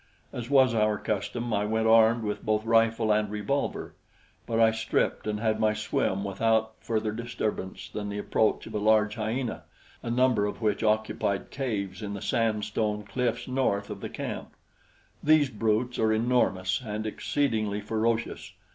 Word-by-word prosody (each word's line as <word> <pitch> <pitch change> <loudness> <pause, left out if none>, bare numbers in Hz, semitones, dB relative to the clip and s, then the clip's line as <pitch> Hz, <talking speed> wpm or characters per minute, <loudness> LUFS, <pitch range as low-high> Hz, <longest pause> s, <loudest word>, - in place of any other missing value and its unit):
As 120 0 -5
was 130 -3 +5
our 105 -1 +2
custom, 110 +4 -3
I 105 0 +1
went 110 +1 0
armed 115 +1 +5
with 105 -1 -3
both 110 0 0
rifle 115 -1 +3
and 105 0 +1
revolver; 105 +7 -2 0.5
but 115 -1 0
I 115 -1 +6
stripped 110 -1 -1
and 105 -1 -1
had 110 -1 0
my 110 -1 +2
swim 105 -2 -1
without 110 +3 +1
further 110 -2 -1
disturbance 110 -4 -4
than 105 -1 -5
the 100 - -4
approach 105 +1 +1
of - - -9
a 105 - -1
large 105 0 +3
hyena, 115 +2 -3 0.4
a - - -5
number 120 -4 +3
of 105 - -5
which 105 -3 0
occupied 110 -2 0
caves 105 -8 -3
in 100 -1 -4
the - - -5
sand 110 -2 0
stone 105 0 -1
cliffs 120 +2 -2
north 125 -6 0
of - - -7
the - - -5
camp. - - -6 0.7
These 150 -3 +4
brutes 115 +3 0
are 110 -1 +3
enormous 110 -5 +1
and 110 -1 -4
exceedingly 110 -3 -1
ferocious. 110 +2 -2
110 Hz, 165 wpm, -27 LUFS, 105-115 Hz, 0.7 s, I